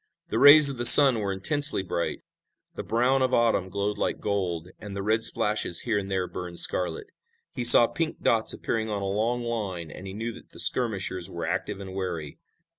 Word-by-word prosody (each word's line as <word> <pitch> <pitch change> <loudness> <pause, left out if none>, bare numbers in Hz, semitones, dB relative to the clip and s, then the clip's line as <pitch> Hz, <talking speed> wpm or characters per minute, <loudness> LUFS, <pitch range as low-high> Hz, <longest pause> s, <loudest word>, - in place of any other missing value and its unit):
The - - -3
rays 145 +1 +7
of 140 -2 0
the 120 - -3
sun 135 -5 +9
were 100 -2 -5
intensely 145 +5 0
bright. 85 -2 -6 0.5
The - - -8
brown 125 +4 -2
of 130 -1 -1
autumn 115 -5 -1
glowed 100 +2 -5
like - - -4
gold, 90 -4 -5
and 100 -1 -11
the 100 - -6
red 110 +2 -1
splashes 105 -5 -1
here 110 -4 -3
and 100 -1 -9
there 95 -1 -3
burned 90 -1 -10
scarlet. 85 -2 -1 0.5
He 125 - -6
saw 120 - +8
pink 160 +6 -6
dots 115 -1 0
appearing 110 -1 -5
on 100 -2 -5
a - - -5
long 110 +5 -4
line 100 -9 -7
and 95 - -12
he 95 - -10
knew 115 +2 -7
that - - -17
the - - -12
skirmishers 95 -7 -1
were 85 -1 -8
active 95 +4 -6
and 95 -1 -11
wary. 90 -6 -7
105 Hz, 200 wpm, -23 LUFS, 95-120 Hz, 0.5 s, sun